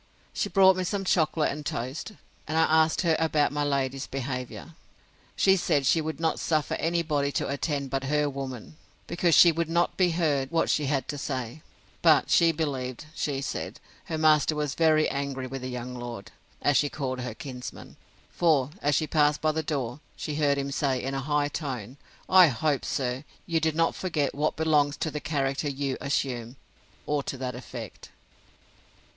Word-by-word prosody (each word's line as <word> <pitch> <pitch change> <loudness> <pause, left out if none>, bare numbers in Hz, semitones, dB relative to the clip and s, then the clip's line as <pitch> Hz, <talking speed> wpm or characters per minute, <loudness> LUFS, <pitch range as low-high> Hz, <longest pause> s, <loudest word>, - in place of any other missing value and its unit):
She - - -1
brought 190 -1 +6
me 185 - 0
some 195 +2 -2
chocolate 160 -3 +2
and 150 +1 -6
toast; 135 - -4 0.3
and 155 +1 -1
I 160 - +5
asked 160 0 +3
her 165 -3 +3
about 155 -3 +2
my 145 0 -1
lady's 135 -2 -1
behaviour. 130 +4 -5 0.6
She 190 -1 +4
said, 145 -6 +1
she 160 - +3
would 160 +1 -4
not 165 -1 0
suffer 155 -2 0
any 170 +1 +1
body 145 -3 0
to - - -1
attend 140 -1 -2
but 135 0 -1
her 150 +1 +1
woman, 135 0 -6 0.3
because 170 -1 +2
she 170 - +8
would 165 0 -2
not 170 +1 +1
be 185 -2 +4
heard 150 -6 0
what 165 +1 +1
she 150 -2 +1
had 135 -2 0
to 145 - -3
say; 130 0 -4 0.4
but 155 -4 +4
she 170 -1 +5
believed, 140 -5 -3
she 140 -3 -2
said, 140 - -5 0.3
her 160 - -3
master 155 -1 +4
was 150 -2 -1
very 155 -1 +3
angry 140 -2 -3
with 135 +1 -6
the 130 - -4
young 125 0 -5
lord, 120 -4 -7 0.3
as 145 - +4
she 145 - +2
called 130 -3 -3
her 125 -3 -5
kinsman; 125 -2 -8 0.4
for, 150 -5 +2
as 145 -1 +2
she 155 - +1
passed 150 -1 +2
by 155 - +2
the 160 +1 -1
door, 140 -5 -3 0.2
she 150 - -4
heard 145 -1 +2
him 140 0 -2
say, 135 -2 0
in 135 +2 -3
a 135 - -2
high 145 +1 +1
tone, 130 -5 -5 0.3
I 185 -2 +8
hope, 145 +1 0
sir, 125 0 -2 0.2
you 165 -1 +1
did 160 -1 0
not 165 0 +2
forget 155 -7 -1
what 150 +2 0
belongs 150 -3 +2
to 155 - -2
the 150 - -3
character 140 -1 -1
you 140 -1 -2
assume; 125 -4 -2 0.5
or 150 -1 0
to 135 - -5
that 130 -1 -4
effect. 120 -3 -9
145 Hz, 185 wpm, -27 LUFS, 135-160 Hz, 0.6 s, she